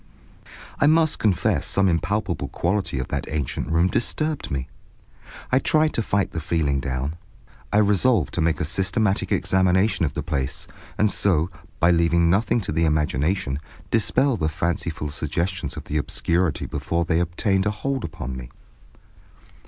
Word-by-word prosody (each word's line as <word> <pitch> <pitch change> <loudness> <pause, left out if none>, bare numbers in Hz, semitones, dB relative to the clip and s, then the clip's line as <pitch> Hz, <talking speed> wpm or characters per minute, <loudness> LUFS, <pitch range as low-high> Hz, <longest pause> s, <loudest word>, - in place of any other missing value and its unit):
I 145 - +4
must 160 0 +3
confess 100 -5 +1
some 100 0 +2
impalpable 90 -2 -1
quality 90 +1 -1
of 65 - -3
that - - -3
ancient 75 -3 -2
room 85 +2 +3
disturbed 155 +9 -2
me. 65 -1 -3 0.8
I 130 - +5
tried 155 +1 +2
to - - 0
fight 100 -2 0
the 80 - -3
feeling 80 -4 0
down. 65 +4 -3 0.5
I - - +3
resolved 105 - +3
to 85 - 0
make 80 0 +1
a - - 0
systematic 95 +5 0
examination 95 0 +2
of 70 - 0
the - - -3
place, 70 -1 -3 0.3
and 105 0 +3
so, 85 -4 +1 0.3
by 85 +2 +5
leaving 85 0 +3
nothing 110 +4 +2
to 95 - -4
the 80 +2 +1
imagination, 75 0 0 0.3
dispel 125 +3 +2
the 80 -3 0
fanciful 80 -2 -2
suggestions 85 +2 -2
of - - -6
the 75 - -3
obscurity 85 +2 0
before 85 0 -2
they 80 -1 +1
obtained 95 +3 +1
a - - +2
hold 135 +5 -3
upon 65 -5 -5
me. 60 -2 -8
85 Hz, 155 wpm, -23 LUFS, 75-100 Hz, 0.8 s, I